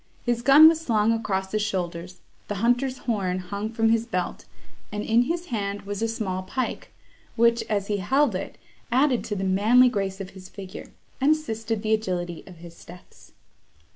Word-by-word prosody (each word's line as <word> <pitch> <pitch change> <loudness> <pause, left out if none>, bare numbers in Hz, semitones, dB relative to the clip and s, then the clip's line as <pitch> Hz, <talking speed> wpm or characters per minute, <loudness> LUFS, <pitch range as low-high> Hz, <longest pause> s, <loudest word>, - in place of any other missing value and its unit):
His 240 -1 0
gun 275 +5 +8
was 320 0 +3
slung 225 -6 +2
across 190 -4 -2
his 215 - 0
shoulders, 180 -3 -4 0.3
the 205 - -3
hunter's 245 +5 +1
horn 195 -6 0
hung 200 +3 -4
from 225 0 +1
his 230 0 +1
belt, 180 -5 -3 0.5
and 210 0 -3
in 235 +2 +3
his 340 +4 -2
hand 200 -1 -3
was 200 +1 -5
a 225 - +1
small 195 -5 -3
pike, 255 +7 -4 0.4
which, 235 0 +3
as 205 -2 0
he 205 0 -1
held 265 +6 +2
it, 185 - -5 0.3
added 260 0 +3
to 210 - -3
the 195 - -3
manly 215 +7 +5
grace 195 -4 -3
of 195 -1 -7
his 190 -1 -12
figure, 195 -1 -9 0.3
and 290 +3 +5
assisted 225 -8 -3
the 220 0 +1
agility 180 -5 -2
of 180 - -11
his 170 0 -13
steps. 175 +1 -16
215 Hz, 180 wpm, -25 LUFS, 190-235 Hz, 0.5 s, gun